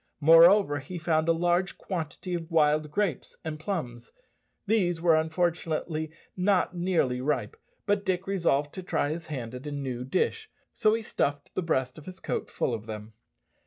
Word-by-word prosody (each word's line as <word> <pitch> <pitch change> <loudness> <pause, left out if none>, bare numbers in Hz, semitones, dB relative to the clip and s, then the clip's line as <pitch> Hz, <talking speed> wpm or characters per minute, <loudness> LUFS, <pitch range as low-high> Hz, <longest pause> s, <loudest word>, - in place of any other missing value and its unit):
Moreover, 165 +1 +7
he 160 +6 -7
found 160 -1 +1
a - - +7
large 175 +2 +1
quantity 180 0 -4
of 170 -1 -3
wild 155 -2 +3
grapes 180 -2 -2
and 155 -1 -4
plums. 155 -9 -4 0.5
These 190 -6 +1
were 165 -1 +4
unfortunately 160 -1 -1 0.3
not 185 -1 +2
nearly 170 -8 +1
ripe, 150 - -1 0.3
but 205 -1 +1
Dick 190 -1 -1
resolved 165 -7 +1
to 190 - -5
try 150 -4 -1
his 165 +1 -5
hand 125 -6 -5
at 125 +4 -7
a - - -4
new 130 -4 -4
dish, 435 - -1 0.2
so 215 -1 +3
he 225 - -3
stuffed 145 -9 -2
the - - -1
breast 130 -6 -1
of 150 - -14
his 185 0 -8
coat - - -3
full 125 - -1
of 110 -1 -5
them. 110 0 -7
165 Hz, 170 wpm, -28 LUFS, 145-185 Hz, 0.5 s, Moreover